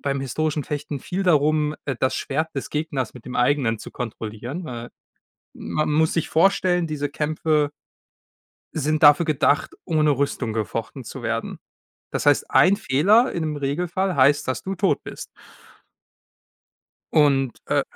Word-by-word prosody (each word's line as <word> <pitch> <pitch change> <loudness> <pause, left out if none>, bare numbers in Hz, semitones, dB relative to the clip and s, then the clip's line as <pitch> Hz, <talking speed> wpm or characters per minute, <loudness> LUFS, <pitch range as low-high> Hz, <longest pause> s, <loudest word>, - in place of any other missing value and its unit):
beim 140 -1 -1
historischen 150 +3 -2
Fechten 145 -1 -4
viel 185 +8 -3
darum, 150 -3 +2
äh, 140 - -2
das 130 - +1
Schwert 155 +4 -2
des 135 - -4
Gegners 145 -6 -3
mit 125 - -12
dem 125 - -6
eigenen 125 -3 +2
zu - - -9
kontrollieren. 120 - -6
Äh, 120 -2 -7 0.6
man 155 - -2
muss 160 +1 +2
sich 165 - -1
vorstellen, 180 0 +3
diese 145 -2 -3
Kämpfe 150 0 0 1.0
sind 155 0 -1
dafür 150 +3 +7
gedacht, 150 -1 +1
ohne 155 -2 +2
Rüstung 140 -4 -1
gefochten 110 -3 -4
zu - - -9
werden. - - -3 0.5
Das - - -2
heißt, 145 -1 +3
ein 190 +3 +5
Fehler- 205 - +3
im 155 -3 -2
Regelfall- 175 +7 -1
heißt, 140 +2 +4
dass 130 -2 -2
du 195 - -3
tot 195 +2 +1
bist. - - -8 1.9
Und, 135 -5 +3
äh - - +2
150 Hz, 145 wpm, -23 LUFS, 135-160 Hz, 1.9 s, dafür